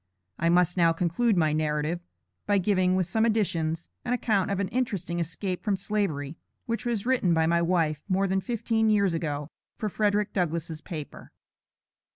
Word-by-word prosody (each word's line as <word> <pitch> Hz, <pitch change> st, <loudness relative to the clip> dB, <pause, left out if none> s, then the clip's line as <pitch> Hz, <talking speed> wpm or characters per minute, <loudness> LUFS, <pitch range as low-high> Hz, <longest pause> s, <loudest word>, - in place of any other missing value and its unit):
I 170 Hz, -, +2 dB
must 180 Hz, +1 st, +3 dB
now 165 Hz, -2 st, +4 dB
conclude 180 Hz, +6 st, +1 dB
my 155 Hz, -3 st, +3 dB
narrative, 155 Hz, +2 st, 0 dB, 0.5 s
by 205 Hz, -1 st, +3 dB
giving, 185 Hz, -1 st, +2 dB
with 185 Hz, -1 st, +2 dB
some 220 Hz, +6 st, +1 dB
additions, 170 Hz, -8 st, 0 dB, 0.2 s
an 245 Hz, -, -1 dB
account 215 Hz, -6 st, +1 dB
of 200 Hz, -1 st, -1 dB
an 200 Hz, -, 0 dB
interesting 200 Hz, -9 st, -2 dB
escape 180 Hz, +3 st, -3 dB
from 205 Hz, -2 st, +1 dB
Slavery, 165 Hz, -8 st, -2 dB, 0.3 s
which 230 Hz, +1 st, -3 dB
was 230 Hz, -3 st, -1 dB
written 240 Hz, -10 st, +2 dB
by 160 Hz, 0 st, +3 dB
my 170 Hz, +1 st, +2 dB
wife, 165 Hz, -4 st, +1 dB
more 195 Hz, +1 st, +2 dB
than 190 Hz, 0 st, +1 dB
fifteen 225 Hz, 0 st, 0 dB
years 200 Hz, -4 st, +3 dB
ago, 150 Hz, -2 st, -3 dB, 0.3 s
for 215 Hz, -, -2 dB
Frederic 210 Hz, 0 st, +1 dB
Douglass' 165 Hz, -3 st, -2 dB
paper. 155 Hz, -3 st, -8 dB
180 Hz, 170 wpm, -27 LUFS, 165-210 Hz, 0.5 s, now